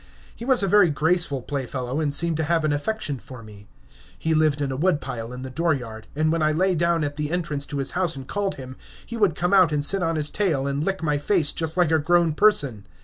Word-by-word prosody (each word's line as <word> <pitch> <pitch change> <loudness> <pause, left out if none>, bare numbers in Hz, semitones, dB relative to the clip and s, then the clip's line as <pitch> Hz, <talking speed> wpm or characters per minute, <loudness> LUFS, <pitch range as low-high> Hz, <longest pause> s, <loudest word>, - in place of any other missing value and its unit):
He 235 - -8
was 260 -5 +4
a - - +1
very 200 -2 +5
graceful 155 -3 0
playfellow, 130 -1 -4
and 150 -2 0
seemed 165 +3 +2
to 160 - -1
have 165 0 +1
an 150 - +1
affection 145 - -3
for 125 -2 -12
me. 105 -1 -14 0.5
He 160 - -1
lived 155 -2 +2
in 140 -2 -2
a - - -3
wood 155 +2 +1
pile 120 -4 -6
in 125 +1 -7
the 130 - -7
dooryard, 125 -9 -2
and 155 +1 +1
when 165 0 0
I 155 0 +2
lay 185 +4 +1
down 170 -1 +1
at 145 0 -4
the 150 -1 -2
entrance 155 -5 -2
to 145 - -5
his 135 -1 -2
house 180 -3 -1
and 135 -1 -9
called 200 -1 -2
him, 130 -1 -10 0.3
he 235 - -7
would 205 -8 +2
come 175 +2 -1
out 185 -4 +5
and 145 -1 0
sit 195 +4 +2
on 165 -1 0
his 150 -1 -1
tail 165 -10 0
and 140 +1 -2
lick 190 -1 -2
my 150 -2 0
face 160 -1 +1
just 160 +1 -2
like 175 -3 +3
a 160 - +3
grown 170 +1 +2
person. 140 - +2
155 Hz, 255 wpm, -23 LUFS, 140-175 Hz, 0.5 s, very